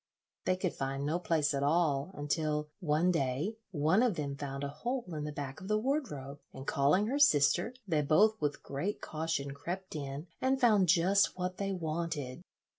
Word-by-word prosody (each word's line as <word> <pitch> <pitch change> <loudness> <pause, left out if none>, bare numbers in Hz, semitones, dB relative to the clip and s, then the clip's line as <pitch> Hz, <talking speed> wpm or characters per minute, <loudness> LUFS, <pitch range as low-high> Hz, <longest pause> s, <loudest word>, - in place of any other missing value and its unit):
They 185 - +3
could 185 -1 -2
find 135 +1 -3
no 160 +4 0
place 160 -4 +1
at 140 - -1
all, 145 0 +2
until 150 +1 -1
one 170 0 +2
day 150 - -1
one 165 +4 +2
of 245 -6 +2
them 140 -3 -3
found 140 0 -5
a - - -1
hole 240 - -3
in 150 -1 -3
the 150 - -3
back 140 +1 -6
of 190 - -8
the 215 +1 +2
wardrobe, 215 - -2
and 135 0 -9
calling 145 +10 +3
her 270 +6 -1
sister, 175 - +4
they 160 -5 +2
both 205 +9 +4
with 145 -1 -1
great 170 +10 -3
caution 155 -3 -3
crept 175 +6 -6
in 140 +1 -5 0.2
and 265 +1 +2
found 210 -8 +4
just 185 +4 +4
what 180 0 -3
they 195 0 -2
wanted. 160 -5 -3
160 Hz, 185 wpm, -32 LUFS, 145-190 Hz, 0.2 s, sister